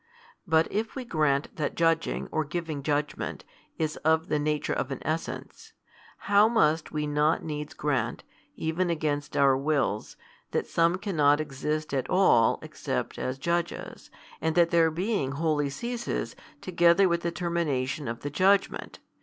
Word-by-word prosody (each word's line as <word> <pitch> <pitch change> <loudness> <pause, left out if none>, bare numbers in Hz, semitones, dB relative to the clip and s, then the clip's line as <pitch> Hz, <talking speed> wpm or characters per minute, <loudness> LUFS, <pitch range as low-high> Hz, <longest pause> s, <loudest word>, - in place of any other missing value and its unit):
But 160 0 +3
if 215 +2 -2
we 260 -2 -5
grant 150 -7 0
that 150 -3 -2
judging 165 -1 +1
or 155 - 0
giving 155 -1 -4
judgment 145 +1 -2 0.3
is 155 -1 -2
of 160 +2 +1
the 150 - +1
nature 150 0 -1
of 130 - -2
an 135 - -3
essence, 160 +2 -4 0.5
how 205 +2 +5
must 160 -9 +2
we 150 -1 -2
not 150 +2 +1
needs 150 -1 -5
grant, 130 -6 -1 0.3
even 165 +3 -1
against 150 -2 -2
our 135 -1 +5
wills, 135 -6 -1 0.4
that - - 0
some 170 +2 +2
cannot 155 -8 +2
exist 155 +1 -3
at 135 -2 -1
all, 180 -12 +4
except - - -4
as 130 +1 -2
judges, 170 +4 -3 0.3
and 160 0 0
that 170 -1 +4
their 165 -1 +4
being 170 -4 -1
wholly 150 -1 0
ceases 235 - -4 0.3
together 175 +1 +4
with 170 -1 0
the 170 - -1
termination 160 -6 -1
of 115 +1 -4
the 145 - -4
judgment? 195 +5 +1
155 Hz, 150 wpm, -27 LUFS, 145-170 Hz, 0.5 s, how